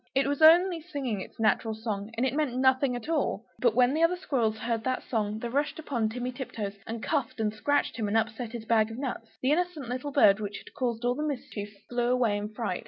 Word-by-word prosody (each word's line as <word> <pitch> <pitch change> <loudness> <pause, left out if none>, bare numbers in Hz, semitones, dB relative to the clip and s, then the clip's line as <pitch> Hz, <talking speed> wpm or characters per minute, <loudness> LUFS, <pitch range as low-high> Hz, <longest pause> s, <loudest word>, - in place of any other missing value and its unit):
It 270 - +3
was 285 +2 -1
only 340 +2 +7
singing 275 - -3
its - - -11
natural 220 0 +2
song, 215 -2 -4
and 245 - +2
it 260 - 0
meant 290 -4 0
nothing 260 0 +3
at 245 +1 -6
all. 290 -9 0
But 240 -3 +3
when 250 +1 +4
the 315 - 0
other 330 +2 +4
squirrels 240 -11 0
heard 225 0 -2
that 255 0 -1
song, 215 -3 -1
they 235 - -4
rushed 285 +5 -1
upon 245 -8 -1
Timmy 250 +2 -3
Tiptoes 230 -6 -5
and 225 0 -5
cuffed 280 -9 -1
and 215 -1 0
scratched 290 +6 0
him, 220 -3 -1
and 210 +2 +2
upset 225 +1 -2
his 230 -2 -6
bag 220 -1 +3
of 225 - -7
nuts. 255 -4 -4 0.2
The 260 - +3
innocent 325 -5 -1
little 255 +3 -3
bird 215 -8 +5
which 205 -1 -4
had - - -13
caused 240 -2 -2
all 245 - +3
the 290 - -4
mischief, 245 -8 -4 0.2
flew 240 0 0
away 240 -4 +2
in 205 0 -2
a - - -3
fright! 215 -4 -3
245 Hz, 240 wpm, -28 LUFS, 220-280 Hz, 0.2 s, only